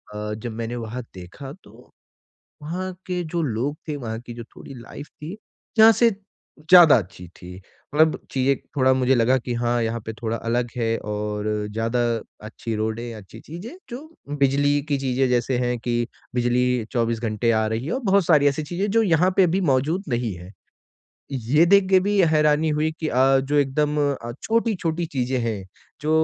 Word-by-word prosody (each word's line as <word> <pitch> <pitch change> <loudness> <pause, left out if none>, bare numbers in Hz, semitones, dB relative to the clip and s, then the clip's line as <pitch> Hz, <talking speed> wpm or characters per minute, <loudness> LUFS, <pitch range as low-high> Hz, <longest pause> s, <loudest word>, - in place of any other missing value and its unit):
अ, 105 0 -4
जब 110 +2 -6
मैंने 115 +2 -4
वहाँ 120 +1 -5
देखा 95 +10 -10
तो - - -18 0.7
वहाँ 185 +5 -4
के 180 -1 -2
जो 170 +1 -2
लोग 135 +1 -2
थे, 150 - -3
वहाँ 115 -5 -5
की 120 0 -10
जो 115 0 -8
थोड़ी 125 - -13
लाइफ़ 125 +4 -10
थी, 165 +8 -9 0.4
यहाँ 220 +1 +9
से 230 +2 +4 0.5
ज़्यादा 160 -2 +7
अच्छी 90 -3 -6
थी। 90 0 -11 0.4
मतलब 155 +1 +4
चीज़ें 135 +1 +2 0.2
थोड़ा 130 -1 +4
मुझे 130 0 +2
लगा 125 +2 +3
कि 120 0 -4
हाँ 120 0 0
यहाँ 115 +1 -2
पे 110 - -5
थोड़ा 115 +1 -3
अलग 120 +2 -1
है 115 -1 0
और 105 0 -4 0.3
ज़्यादा 115 +3 -1 0.5
अच्छी 115 +1 -5
रोडें, 110 +2 -3
अच्छी 105 +1 -12
चीज़ें, 175 - -9 0.2
जो 305 +7 -9 0.2
बिजली 145 +1 +2
की 145 - +2
चीज़ें 135 -1 0
जैसे 125 +1 +1
हैं 125 0 0
कि 120 0 -1 0.3
बिजली 125 -1 +1
24 115 -1 0
घंटे 115 0 0
आ 110 -1 +2
रही 110 +4 -3
है - - -3
और 260 - -1
बहुत 195 -3 +3
सारी 150 -4 +4
ऐसी 145 +2 0
चीज़ें 180 +7 -2
जो 225 0 +3
यहाँ 180 -1 +3
पे 190 - +7
अभी 180 +3 +1
मौजूद 150 +9 0
नहीं 120 -4 -1
है। 90 +2 -11 0.8
ये 135 +5 +3
देख 200 +1 +5
के 190 - +7
भी 200 +1 +1
हैरानी 150 0 +3
हुई 155 +1 0
कि 160 - -1
अ, 135 +1 +4
जो 140 +2 -2
एकदम 145 +2 +1 0.2
अ, 120 -3 -6
छोटी-छोटी 190 -8 0
चीज़ें 130 -4 -2
हैं 110 -5 -3 0.4
जो 155 - -1
130 Hz, 185 wpm, -23 LUFS, 115-155 Hz, 0.8 s, यहाँ